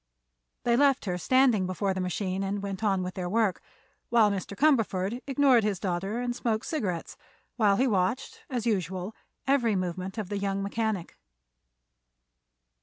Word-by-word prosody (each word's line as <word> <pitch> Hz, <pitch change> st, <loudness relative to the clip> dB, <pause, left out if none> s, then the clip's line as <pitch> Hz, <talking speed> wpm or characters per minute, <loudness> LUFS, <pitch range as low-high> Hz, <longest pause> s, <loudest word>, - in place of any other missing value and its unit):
They 235 Hz, -1 st, +3 dB
left 275 Hz, -1 st, +3 dB
her 180 Hz, -2 st, -2 dB
standing 245 Hz, -3 st, +3 dB
before 190 Hz, +1 st, -1 dB
the 190 Hz, -, -3 dB
machine 185 Hz, +1 st, -2 dB
and 200 Hz, +1 st, -2 dB
went 195 Hz, +1 st, -4 dB
on 195 Hz, -3 st, +2 dB
with 180 Hz, 0 st, -4 dB
their 180 Hz, -2 st, -4 dB
work, 215 Hz, -2 st, +1 dB, 0.5 s
while 225 Hz, -3 st, +5 dB
Mr. 200 Hz, 0 st, -4 dB
Cumberford 225 Hz, -6 st, +2 dB
ignored 270 Hz, -4 st, +4 dB
his 205 Hz, -3 st, 0 dB
daughter 195 Hz, +4 st, -2 dB
and 245 Hz, -1 st, -2 dB
smoked 225 Hz, -3 st, -1 dB
cigarettes 195 Hz, -, -3 dB, 0.4 s
while 210 Hz, -4 st, +4 dB
he 255 Hz, -, +2 dB
watched, 220 Hz, +3 st, 0 dB
as 245 Hz, -4 st, -2 dB
usual, 190 Hz, -1 st, -1 dB, 0.3 s
every 255 Hz, -6 st, +2 dB
movement 185 Hz, +2 st, -3 dB
of 210 Hz, -4 st, -4 dB
the 205 Hz, -1 st, -2 dB
young 195 Hz, 0 st, -1 dB
mechanic. 210 Hz, -3 st, -2 dB
205 Hz, 155 wpm, -28 LUFS, 185-235 Hz, 0.5 s, while